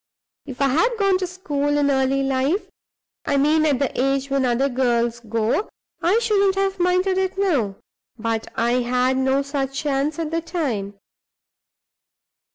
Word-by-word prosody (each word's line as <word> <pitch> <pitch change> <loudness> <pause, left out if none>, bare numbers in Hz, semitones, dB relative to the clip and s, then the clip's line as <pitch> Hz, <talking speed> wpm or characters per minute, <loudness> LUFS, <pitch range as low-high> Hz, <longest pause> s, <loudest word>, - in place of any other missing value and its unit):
"If 265 +1 -3
I 275 - +3
had 455 - +2
gone 395 -3 +2
to 370 - -2
school 290 -5 -2
in 285 -1 +2
early 270 0 +1
life 270 +8 0 0.6
I 285 - +1
mean 310 +3 +3
at 285 -3 +2
the 265 -1 -1
age 275 +1 0
when 275 -1 +2
other 250 +2 +1
girls 240 -2 0
go 230 - -1 0.3
I 365 +6 +3
shouldn't 400 -4 +2
have 390 -1 -1
minded 365 +1 +2
it 380 0 -2
now. 285 - +1 0.4
But 225 0 -3
I 240 +2 +1
had 250 +1 +1
no 265 +1 +1
such 275 -1 -3
chance 290 0 -1
at 325 -2 -3
the 330 0 -1
time. 255 - -3
275 Hz, 160 wpm, -22 LUFS, 255-350 Hz, 0.6 s, I